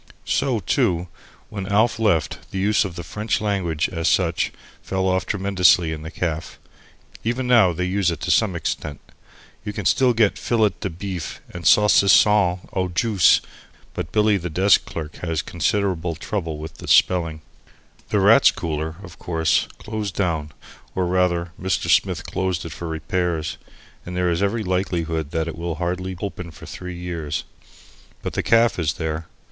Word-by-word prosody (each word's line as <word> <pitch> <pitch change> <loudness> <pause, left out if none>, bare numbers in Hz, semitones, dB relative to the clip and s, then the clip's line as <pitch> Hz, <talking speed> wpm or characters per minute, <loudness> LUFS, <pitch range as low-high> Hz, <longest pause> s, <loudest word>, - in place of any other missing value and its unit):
So, 130 -5 +1
too, 85 0 0 0.4
when 100 -2 -5
Alf 110 +3 +2
left, 85 -9 0
the - - -5
use 105 +2 +2
of 90 -3 -6
the 85 - -6
French 105 +6 -2
language, 95 -7 0
as 85 -3 -2
such, 85 -3 +1 0.3
fell 95 0 -1
off 95 0 0
tremendously 90 -4 +3
in 75 - -6
the 80 - -7
caff. 80 -2 -4 0.7
Even 120 +3 -1
now 120 -7 +5
they 90 +2 -2
use 95 0 +1
it 85 -3 -3
to 90 - 0
some 95 -1 +3
extent. 75 -3 -3 0.6
You 105 -1 -5
can 100 -3 -5
still 125 +4 +4
get 110 -3 +2
fillet 110 -3 +2
de 95 - -3
beef, 90 -1 -6
and 85 0 -3
saucisson 105 -2 +5
au 95 -1 0
juice, 100 -1 +4 0.5
but 75 - -5
Billy 105 -1 +3
the 90 -1 -4
desk 95 +5 +4
clerk 80 -2 -7
has 80 -2 -2
considerable 90 -1 -1
trouble 80 -2 -4
with 80 0 -9
the - - -9
spelling. 80 -4 +3 0.7
The - - +2
Rats' - - +7
Cooler, 80 -1 -3
of 85 -5 -12
course, 80 -3 +1
closed 105 -3 -5
down, 80 -6 -1 0.4
or 95 - +1
rather 90 -1 +1
Mr. 95 -2 0
Smith - - +2
closed 95 -3 -2
it 85 - -6
for 85 +2 -6
repairs, 80 0 -2 0.4
and 90 0 -6
there 90 -1 +2
is 85 +2 -1
every 105 +3 0
likelihood 85 -5 -1
that 80 0 -2
it 85 - -5
will 85 0 -4
hardly 90 +2 -3
open 90 -3 -5
for 80 0 -12
three 90 -1 -7
years. 85 -4 -4 0.8
But - - -4
the - - 0
caff 115 -3 +3
is 80 -3 +1
there. 80 -2 -4
90 Hz, 165 wpm, -22 LUFS, 80-100 Hz, 0.8 s, Rats